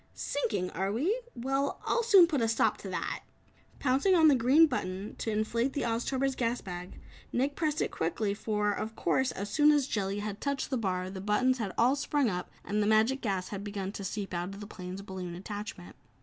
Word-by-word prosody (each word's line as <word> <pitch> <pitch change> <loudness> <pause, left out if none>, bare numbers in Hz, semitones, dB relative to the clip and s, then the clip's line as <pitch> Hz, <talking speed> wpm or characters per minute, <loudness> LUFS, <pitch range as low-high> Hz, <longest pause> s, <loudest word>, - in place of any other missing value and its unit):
"Sinking, 200 -10 -2
are 190 +3 -1
we? 350 - 0
Well, 270 +3 -1
I'll 475 - +2
soon 405 -6 +7
put 305 -6 -1
a 225 - +2
stop 225 - +2
to - - -7
that!" - - -3 0.6
Pouncing 280 +8 +3
on 320 -2 +7
the 285 - +5
green 260 +7 +6
button 200 -8 -3
to - - -2
inflate 230 +4 0
the 285 - -1
Oztober's 255 +3 0
gas 240 -1 0
bag, 180 -1 -8 0.3
Nick 275 +3 0
pressed 305 -2 0
it - - -3
quickly, 200 +5 -1
for 210 0 0
of 220 +2 -4
course, 265 0 +1
as 200 +1 -5
soon 300 0 +5
as 290 -3 +3
Jellia 200 -4 -2
had 205 -1 -5
touched 280 0 -2
the - - +1
bar, 185 -4 -2
the 190 -1 -6
buttons 235 +5 +2 0.2
all 235 +2 +5
had 275 - +1
sprung 280 -4 +1
up 180 0 -4 0.2
and 210 +1 0
the 205 - +1
magic 220 +5 +3
gas 190 -4 -2
had 200 -1 -5
begun 200 -2 -4
to 200 - -7
seep 195 0 -4
out 175 +3 -3
of - - -10
the 205 - -7
plane's 185 -1 -7
balloon 185 -3 -6
attachment. 205 - -7
220 Hz, 210 wpm, -30 LUFS, 195-270 Hz, 0.6 s, soon